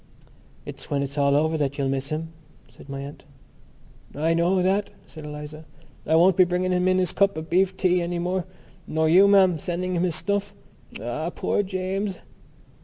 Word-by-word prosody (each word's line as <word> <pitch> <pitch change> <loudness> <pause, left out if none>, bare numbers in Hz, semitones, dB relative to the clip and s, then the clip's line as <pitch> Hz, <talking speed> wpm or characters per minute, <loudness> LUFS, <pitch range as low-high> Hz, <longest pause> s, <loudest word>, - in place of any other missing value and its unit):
"It's - - -9
when 140 -1 0
it's 140 0 -6
all 140 -1 +2
over 160 +2 +1
that 140 -1 -1
you'll 140 -2 0
miss 135 +1 -2
him," 160 +1 -3 0.4
said - - -16
my 135 0 -5
aunt. 140 +1 -9 0.9
"I 160 +3 +1
know 175 +2 +2
that," 195 +2 +1 0.2
said 155 -2 -11
Eliza. 150 +1 -8 0.4
"I 160 - +3
won't 175 +2 +5
be 185 - +6
bringing 180 +1 -1
him 180 0 +1
in 185 0 +3
his 185 -3 +1
cup 200 -3 +2
of 160 +1 -7
beef 190 +1 +2
tea 180 -1 +2
any 175 0 -2
more, 180 +1 -2 0.4
nor 160 0 +1
you, 185 +5 +6
ma'am, 190 -4 +4
sending 180 +3 -3
him 170 - 0
his 175 -3 0
snuff. 200 0 -2 0.4
Ah, 120 +9 -3
poor 190 - -1
James!" 190 +1 -3
175 Hz, 185 wpm, -24 LUFS, 155-185 Hz, 0.9 s, be